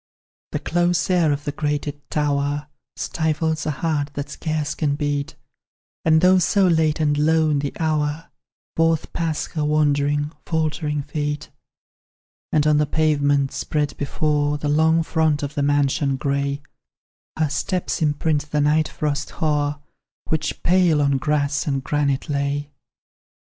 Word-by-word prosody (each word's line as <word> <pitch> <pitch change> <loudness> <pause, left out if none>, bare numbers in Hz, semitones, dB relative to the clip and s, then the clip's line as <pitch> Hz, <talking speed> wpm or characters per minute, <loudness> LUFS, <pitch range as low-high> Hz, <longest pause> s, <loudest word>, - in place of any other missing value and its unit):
The - - -1
close 175 +1 +1
air 170 -4 +3
of 145 0 -2
the 145 - -2
grated 145 0 -3
tower 145 0 -1 0.3
Stifles 160 0 -1
a - - +1
heart 150 -3 0
that 145 0 -4
scarce 155 -2 -2
can 145 -3 0
beat, 145 -1 -2 0.7
And, 160 -1 +4
though 185 +1 +6
so 195 +3 +3
late 160 -3 +2
and 150 -2 +2
lone 155 -1 +3
the 140 0 -2
hour, 155 0 -1 0.4
Forth 165 -1 +1
pass 165 -2 -1
her 155 - -2
wandering, 145 -1 +1
faltering 155 -2 -1
feet; 150 -1 -3 1.0
And 150 -1 +2
on 150 -1 +4
the 150 0 +2
pavement 145 -3 +2
spread 150 -1 -2
before 145 0 0
The 145 0 -2
long 160 +2 +3
front 160 -3 +1
of 145 0 -4
the 145 - -1
mansion 140 -1 +1
grey, 140 +1 -1 0.7
Her 155 -2 +1
steps 180 +6 -2
imprint 150 -1 0
the 150 - 0
night 155 +2 +3
frost 150 -2 -2
hoar, 145 -2 0 0.5
Which 160 -1 -2
pale 175 -3 +4
on 140 -1 +2
grass 150 +2 0
and 135 -2 -1
granite 140 0 0
lay. 145 0 -2
150 Hz, 140 wpm, -22 LUFS, 145-160 Hz, 1.0 s, though